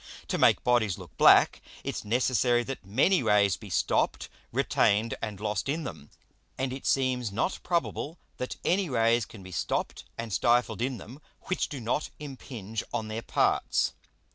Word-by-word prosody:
To - - -1
make - - +5
Bodies 115 -7 +2
look - - -12
black, - - +6 0.2
it's - - -4
necessary 120 +1 +2
that 135 -2 -6
many 135 - +3
Rays 100 -2 +4
be - - -11
stopp'd, - - 0 0.2
retained, 110 +3 +2
and 105 -4 -4
lost 105 +3 -2
in 160 +3 -1
them; 75 - -8 0.5
and 130 -1 -1
it 135 - -6
seems 130 -4 +1
not 120 - -1
probable 170 -2 -2 0.2
that 125 - -4
any 185 -1 +2
Rays 115 -2 +3
can 100 -4 -12
be 95 - -10
stopp'd 85 - -2
and 115 -3 -5
stifled 120 +2 +2
in 130 0 -1
them 130 +7 -11 0.2
which 185 - -2
do 140 - -5
not 120 +6 -1
impinge 125 -7 -6
on 110 -2 -3
their 110 +1 -3
parts. - - +1
120 Hz, 165 wpm, -28 LUFS, 105-135 Hz, 0.5 s, black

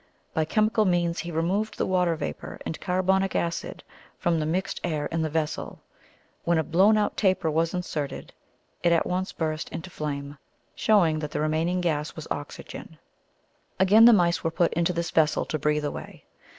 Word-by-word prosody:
By 160 - +1
chemical 215 +5 +2
means 175 -2 +1
he 170 - -4
removed 185 +7 -1
the - - 0
water 180 -3 +2
vapour - - -6
and 160 - -5
carbonic 190 +1 +1
acid 170 0 -2 0.3
from 170 -1 +1
the 155 - -1
mixed 180 +4 -2
air 155 -4 -1
in 165 +2 -2
the 160 - 0
vessel. 155 0 -3 0.6
When 170 0 +2
a 160 - +2
blown 190 +8 +4
out 210 -1 0
taper 185 -5 +1
was 165 +2 0
inserted, 155 -5 -4 0.5
it 170 - +3
at 170 - +3
once 185 +2 -2
burst 155 -2 -3
into 180 +2 -7
flame, 145 -2 -5 0.3
showing 175 -8 +3
that 150 -1 -4
the - - -3
remaining 160 +4 0
gas 155 -3 -1
was 160 - -8
oxygen. 145 0 -7 0.8
Again, 205 +4 +7
the 240 - +10
mice 175 -5 +3
were 165 - +1
put 170 +1 +1
into 170 +2 +1
this 170 -1 -3
vessel 155 -1 +2
to 155 - -3
breathe 150 +1 +1
away. 145 - -7
170 Hz, 175 wpm, -26 LUFS, 155-185 Hz, 0.8 s, the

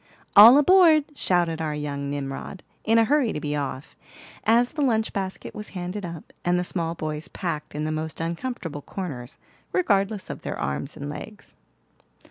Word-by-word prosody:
"All 225 +6 +11
aboard!" 320 -1 +6
shouted 175 - 0
our 155 -2 -2
young 140 -1 -4
Nimrod, 140 +6 -5 0.2
in 225 +1 +3
a 230 - +6
hurry 270 -1 +2
to - - -3
be 150 0 -2
off, 140 0 -4 0.5
as 235 +2 +4
the 300 - -4
lunch 225 -5 +1
basket 190 -1 -4
was 210 0 -7
handed 180 +3 -4
up, 170 -2 -10
and 175 0 +2
the 180 - 0
small 170 -2 -1
boys 155 +1 -4
packed 160 -6 -5
in 150 - -2
the 155 - -1
most 155 0 -4
uncomfortable 165 - -4
corners, 140 -9 -6 0.3
regardless 205 - +1
of - - -8
their - - -4
arms 70 - -3
and 145 - -6
legs. 150 +8 -9
175 Hz, 170 wpm, -25 LUFS, 150-220 Hz, 0.5 s, All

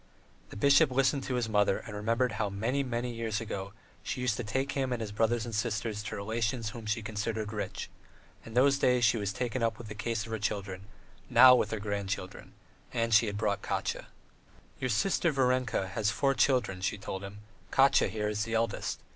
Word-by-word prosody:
The - - -9
bishop 140 +4 +5
listened 135 +2 +2
to 130 - -2
his 120 -2 0
mother 105 -2 +2
and 110 - -9
remembered 115 +4 0
how 105 -1 -1
many, 115 +8 -1
many 125 -2 -3
years 115 -2 -2
ago 100 -3 -5 0.3
she - - -4
used 125 -3 +1
to 125 - -3
take 130 +6 -1
him 135 -2 -1
and 125 - -1
his 110 -2 -4
brothers 115 +2 +1
and 115 - -6
sisters 105 -1 -2
to 105 - -5
relations 110 +2 -2
whom 115 -2 -9
she 110 +1 -1
considered 110 0 -3
rich; 105 - -4 0.6
in 115 - -11
those 140 +2 +4
days 125 -1 +3
she 110 +2 +3
was 100 -2 -2
taken 120 +4 -3
up 115 -1 0
with 115 -3 -9
the - - -5
care 110 +2 -3
of 110 -2 -2
her 110 -1 -4
children, 100 -2 -3 0.4
now 130 -1 +9
with 125 - +2
her 110 - -3
grandchildren, 100 -2 -4 0.4
and 115 0 0
she 110 +1 +6
had 100 0 -3
brought 105 -1 0
Katya.... - - -3 0.7
"Your 130 - -1
sister, 170 - +2
Varenka, 130 -7 +1
has 105 +1 0
four 135 +5 +1
children," 125 -9 +1
she 95 +2 -1
told 95 -1 -6
him; 100 +1 -9 0.3
"Katya, 135 0 +4
here, 105 -1 -2
is 105 0 -1
the 115 0 -3
eldest. 115 -1 -1
110 Hz, 205 wpm, -30 LUFS, 105-125 Hz, 0.7 s, now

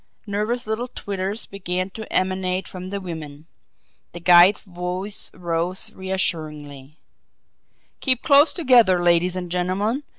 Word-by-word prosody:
Nervous 215 +4 -2
little 220 +3 -3
twitters 200 -2 -4
began 185 -1 -3
to 220 +2 -9
emanate 185 0 0
from 185 0 -8
the 200 +1 -4
women 160 -5 -8 0.7
the 175 - -7
guide's 175 +3 +6
voice 180 +2 -4
rose 175 +1 -2
reassuringly: 155 -6 -4 1.0
"Keep 255 -3 +1
close 285 +1 +6
together, 245 - +4
ladies 175 +1 +2
and 180 -2 -5
gentlemen. 190 +8 -1
185 Hz, 120 wpm, -22 LUFS, 175-205 Hz, 1.0 s, guide's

